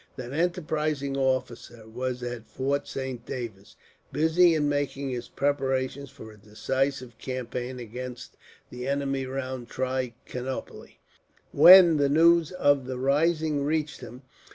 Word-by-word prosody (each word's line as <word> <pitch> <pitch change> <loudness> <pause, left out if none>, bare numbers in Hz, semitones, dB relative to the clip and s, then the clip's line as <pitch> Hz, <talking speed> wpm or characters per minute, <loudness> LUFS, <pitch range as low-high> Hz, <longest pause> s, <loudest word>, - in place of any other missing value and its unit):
That 125 0 -7
enterprising 155 -4 -1
officer 125 -4 -2
was 125 +2 -4
at 120 -2 -6
Fort 140 +2 -2
Saint 130 -3 -5
David, 115 -6 -7 0.4
busy 160 +3 +4
in 150 -2 +1
making 140 -1 -2
his 125 -1 -5
preparations 135 -1 -1
for 110 - -12
a 105 - -17
decisive 125 +3 -3
campaign 125 0 -5
against 125 +1 -8 0.4
the 125 +1 -6
enemy 135 -1 -1
round 130 -2 -5
Trichinopoli, 130 0 -5 0.5
when 170 +1 +9
the 140 -1 +2
news 165 +2 +4
of 145 -7 +2
the 130 -1 -4
rising 150 +2 +1
reached 150 0 -2
him. 125 +2 -10
135 Hz, 125 wpm, -26 LUFS, 125-145 Hz, 0.5 s, when